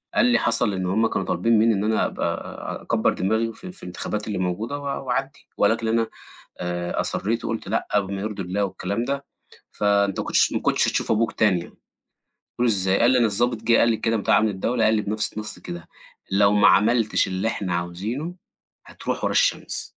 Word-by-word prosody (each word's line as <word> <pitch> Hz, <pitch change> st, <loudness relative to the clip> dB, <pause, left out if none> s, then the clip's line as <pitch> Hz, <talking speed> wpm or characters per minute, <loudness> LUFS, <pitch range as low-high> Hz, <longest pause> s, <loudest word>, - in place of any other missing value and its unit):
قال 240 Hz, -, +4 dB
لي: 245 Hz, 0 st, +4 dB
"حصل 105 Hz, -, +2 dB
إنّه 95 Hz, 0 st, -2 dB
هُم 110 Hz, +2 st, +3 dB
كانوا -, -, -2 dB
طالبين 115 Hz, -1 st, +2 dB
مِنّي 115 Hz, 0 st, +4 dB
إن 100 Hz, +1 st, -1 dB
أنا 110 Hz, +1 st, +1 dB
أبقى -, -, -4 dB
أكبّر -, -, +1 dB
دماغي 110 Hz, +4 st, 0 dB
في 185 Hz, -1 st, -10 dB
في 185 Hz, -, -13 dB
الانتخابات 105 Hz, +4 st, -4 dB
اللي 100 Hz, -3 st, -2 dB
موجودة 100 Hz, +10 st, -2 dB
و -, -, -10 dB, 0.2 s
وأعدّي، 135 Hz, +3 st, -3 dB
ولكن 115 Hz, +2 st, +2 dB
أنا 115 Hz, 0 st, +1 dB, 0.5 s
آآ 90 Hz, 0 st, -2 dB
أصرّيت 115 Hz, +4 st, -1 dB
وقُلت 115 Hz, -3 st, -3 dB
لأ 115 Hz, -, -1 dB
بما 95 Hz, 0 st, -5 dB
يرضي 105 Hz, -2 st, -4 dB
الله 95 Hz, +3 st, -1 dB
والكلام 100 Hz, +4 st, -3 dB
ده 140 Hz, +1 st, -3 dB, 0.5 s
فأنت 100 Hz, -1 st, +1 dB
ما -, -, -5 dB
كُنتش -, -, +3 dB
ما -, -, -1 dB
كُنتش -, -, +2 dB
هتشوف -, -, -1 dB
أبوك 110 Hz, +1 st, +1 dB
تاني 105 Hz, -5 st, +2 dB
يعني" -, -, -10 dB, 0.9 s
قُلت -, -, -9 dB
له: 125 Hz, -, +3 dB
"إزاي؟" 95 Hz, -3 st, +2 dB
قال 120 Hz, +2 st, +5 dB
لي: 130 Hz, -, +4 dB
"أنا 120 Hz, -, +4 dB
الظابط 115 Hz, +3 st, +1 dB
جِه 115 Hz, 0 st, +4 dB
قال 115 Hz, -, +4 dB
لي 110 Hz, -, +1 dB
كده 115 Hz, +1 st, 0 dB
بتاع 100 Hz, -, +3 dB
أمن 110 Hz, -, +2 dB
الدولة 110 Hz, +4 st, 0 dB
قال 110 Hz, +1 st, +4 dB
لي 105 Hz, -, +1 dB
بنفْس 105 Hz, +1 st, -1 dB
النَص 110 Hz, 0 st, -5 dB
كده: 85 Hz, -1 st, -8 dB, 0.4 s
لو 100 Hz, +1 st, +4 dB
ما 105 Hz, -, +6 dB
عملتش 110 Hz, 0 st, +3 dB
اللي 95 Hz, +4 st, -1 dB
إحنا 95 Hz, -5 st, -2 dB
عاوزينه 105 Hz, -, -4 dB, 0.5 s
هتروح -, -, -4 dB
ورا -, -, +1 dB
الشمس." -, -, 0 dB
110 Hz, 205 wpm, -23 LUFS, 95-115 Hz, 0.9 s, ما